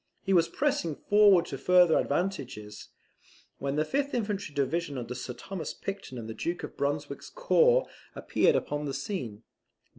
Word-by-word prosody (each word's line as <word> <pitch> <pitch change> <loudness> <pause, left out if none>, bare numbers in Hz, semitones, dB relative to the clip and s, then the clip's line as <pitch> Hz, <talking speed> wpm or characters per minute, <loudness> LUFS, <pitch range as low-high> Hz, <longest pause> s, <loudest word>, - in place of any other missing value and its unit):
He 195 - +1
was 170 -3 +5
pressing 280 - 0
forward 205 -3 +5
to - - -6
further 180 -3 +5
advantages, 135 - -3 0.7
when 140 +1 -2
the 155 +1 +1
fifth 280 - -1
infantry 205 -8 -3
division 145 +1 -1
under 125 0 -5
Sir 125 - -6
Thomas 190 +5 -6
Picton 195 -10 -6
and 115 -2 -6
the 110 - -5
Duke 175 +9 -3
of - - -7
Brunswick's 145 0 -3
corps - - +3 0.3
appeared - - +2
upon 145 0 -1
the 135 -2 -3
scene. 135 - -5
165 Hz, 155 wpm, -29 LUFS, 140-200 Hz, 0.7 s, was